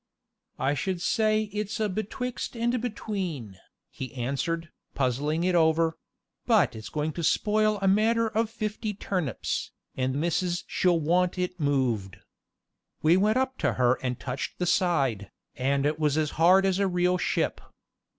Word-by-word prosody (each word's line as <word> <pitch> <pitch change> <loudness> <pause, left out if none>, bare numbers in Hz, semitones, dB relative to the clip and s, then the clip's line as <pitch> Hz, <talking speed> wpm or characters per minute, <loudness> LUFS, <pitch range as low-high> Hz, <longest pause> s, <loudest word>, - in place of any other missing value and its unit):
"I 140 - +1
should 185 +5 -2
say 215 +3 +2
it's 210 +1 -3
a 215 - +1
betwixt 230 +5 -4
and 240 +1 0
between," 185 - -4 0.3
he 130 - -6
answered, 145 +6 -2 0.2
puzzling 140 +5 0
it 185 0 +2
over; 165 -1 +3 0.5
"but - - +3
it's 110 -1 -8
going 150 +1 -2
to 170 - -4
spoil 215 +5 +2
a - - +3
matter 225 +4 +3
of 225 0 0
fifty 215 -1 -4
turnips, 180 - -2 0.2
and 130 0 -1
missus 175 +2 0
she'll 175 -2 +2
want 175 +4 +1
it 180 0 -2
moved." 125 -10 0 0.9
We 160 +3 +5
went 210 +5 +3
up 260 0 -1
to - - +1
her 125 0 +2
and 125 -2 -2
touched 130 +1 -4
the 180 - -1
side, 140 - +1 0.3
and 140 +2 0
it 150 +1 0
was 150 -1 +1
as 155 -2 +1
hard 185 +4 +5
as 190 0 +1
a 200 - +2
real 180 0 +1
ship. - - 0
175 Hz, 155 wpm, -27 LUFS, 140-210 Hz, 0.9 s, We